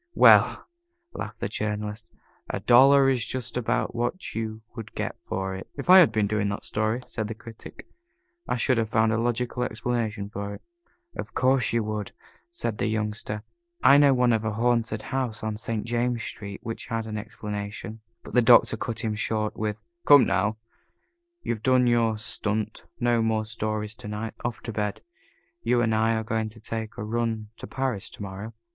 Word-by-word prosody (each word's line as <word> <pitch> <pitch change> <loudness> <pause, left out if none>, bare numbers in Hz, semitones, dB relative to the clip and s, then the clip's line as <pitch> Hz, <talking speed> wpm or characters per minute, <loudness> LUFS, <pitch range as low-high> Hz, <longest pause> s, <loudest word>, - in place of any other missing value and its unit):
"Well," - - +6 0.5
laughed 110 +1 -6
the - - 0
Journalist, 105 +1 -4 0.4
"a - - -2
dollar 135 +3 +6
is 130 -4 +2
just 130 0 -4
about 125 0 0
what 120 +10 -3
you 110 0 -4
would 110 -3 -8
get - - -4
for 95 0 -3
it." 95 - -7
"If 145 +5 +1
I 190 - +11
had 165 -10 +6
been 110 -2 +1
doing 105 0 0
that 100 - -4
story," 110 +4 -1
said 110 -2 -4
the 115 - -5
Critic, 115 0 -11 0.6
"I - - 0
should 125 0 +2
have 110 -1 0
found 110 0 +3
a 110 - +1
logical 120 +1 -1
explanation 110 -3 -2
for 100 0 -5
it." - - -15 0.5
"Of - - -7
course 130 -1 +3
you 115 -1 +1
would," 105 -1 -4 0.4
said 120 -11 -4
the - - +1
Youngster. 105 -1 -3 0.4
"I 140 - +8
know 145 -1 +6
one 125 -1 +3
of 110 -1 +1
a 110 -1 -1
haunted 115 -1 0
house 125 -5 -3
on 110 -1 -2
St. 110 0 -3
James 120 0 0
Street 100 -2 -6
which 115 0 -5
had 115 -2 -2
an 110 -1 -4
explanation." 105 +1 -6 0.2
But - - -11
the 125 - +5
Doctor 120 -1 +6
cut 115 +1 -4
him 110 -3 -1
short 110 0 -1
with: 105 0 -3 0.2
"Come 145 -2 +9
now, 100 +3 +1 0.9
you've 110 -2 -2
done 130 +1 +4
your 115 -2 +2
stunt. 110 -1 -3
No 120 -1 +2
more 110 -1 +1
stories 110 -1 -3
to - - -7
night. 105 +1 -4
Off 120 -1 -3
to 115 - -4
bed. 105 -1 -2 0.6
You 125 - +2
and 115 -2 +2
I 110 +1 +2
are 110 - -1
going 110 0 -1
to 110 +1 -14
take 110 +1 -5
a 110 - -4
run 110 -1 -2
to - - -8
Paris 130 -7 -2
to - - -8
morrow." 100 +3 -7
110 Hz, 190 wpm, -26 LUFS, 105-120 Hz, 0.9 s, I